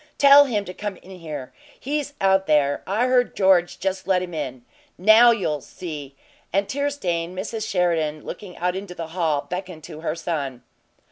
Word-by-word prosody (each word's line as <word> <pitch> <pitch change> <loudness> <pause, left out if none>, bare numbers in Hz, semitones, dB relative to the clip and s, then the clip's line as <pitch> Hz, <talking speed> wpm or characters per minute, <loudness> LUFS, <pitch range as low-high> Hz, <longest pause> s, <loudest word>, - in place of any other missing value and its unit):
"Tell 285 0 +8
him 210 -6 -1
to 180 - -7
come 205 0 -5
in 185 - -15
here! 150 -6 -7 0.3
He's 290 +1 -3
out 190 0 +3
there. 145 -2 +2
I 210 +6 +1
heard 255 -1 +2
George 185 -3 +3
just 190 0 -3
let 185 -2 +2
him 175 -1 -7
in. 130 -6 -5 0.3
Now 220 +6 +7
you'll 170 -11 0
SEE!" 150 -5 -8 0.4
And 195 +2 +1
tear 285 +1 -1
stained 175 -10 -3
Mrs. 215 +3 -4
Sheridan, 165 -5 0
looking 190 -4 -8
out 180 +1 -1
into 190 -2 -6
the 165 -2 -6
hall, 160 -4 0
beckoned 180 -1 -6
to 155 -1 -9
her 160 -1 -2
son. 145 -7 -4
180 Hz, 180 wpm, -23 LUFS, 155-205 Hz, 0.4 s, Tell